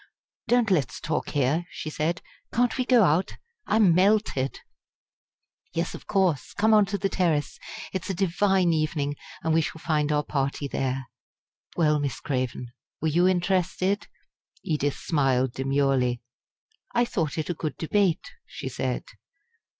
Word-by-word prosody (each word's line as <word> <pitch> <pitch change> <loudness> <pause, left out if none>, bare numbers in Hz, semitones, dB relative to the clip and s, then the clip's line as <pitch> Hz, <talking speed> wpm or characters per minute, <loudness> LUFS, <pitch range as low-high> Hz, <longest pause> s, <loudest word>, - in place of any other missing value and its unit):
"Don't 235 -2 +3
let's 140 -8 +1
talk 155 -1 -2
here," 145 +5 +1
she 155 - -6
said. 165 +3 -1 0.3
"Can't 245 +1 +2
we 255 - +1
go 245 -3 +5
out? 175 +2 +2 0.3
I - - +2
am 205 -6 +5
melted!" 185 -8 +2 1.1
"Yes, 170 +1 -1
of - - -10
course! 185 -9 +1
Come 220 +2 +3
on 210 -2 +5
to 200 +1 -2
the 195 - 0
terrace. 165 -6 0 0.3
It's 190 0 -3
a 190 - -1
divine 190 -1 +2
evening, 150 -2 -1 0.3
and 160 -1 +1
we 165 - +4
shall 160 - -4
find 150 -2 0
our 150 0 +2
party 140 0 -2
there. 135 -1 -2 0.7
Well, 150 -3 +3
Miss 140 -2 -2
Craven, 125 -3 -3 0.3
were 160 - 0
you 175 +4 +3
interested?" 185 +2 +1 0.6
Edith 145 -3 -1
smiled 130 -5 +1
demurely. 135 -2 +1 0.7
"I 240 - +4
thought 165 -10 -2
it 155 +2 -1
a - - -1
good 155 -3 -4
debate," 180 0 +1 0.2
she - - -6
said. - - -2
160 Hz, 150 wpm, -26 LUFS, 145-190 Hz, 1.1 s, go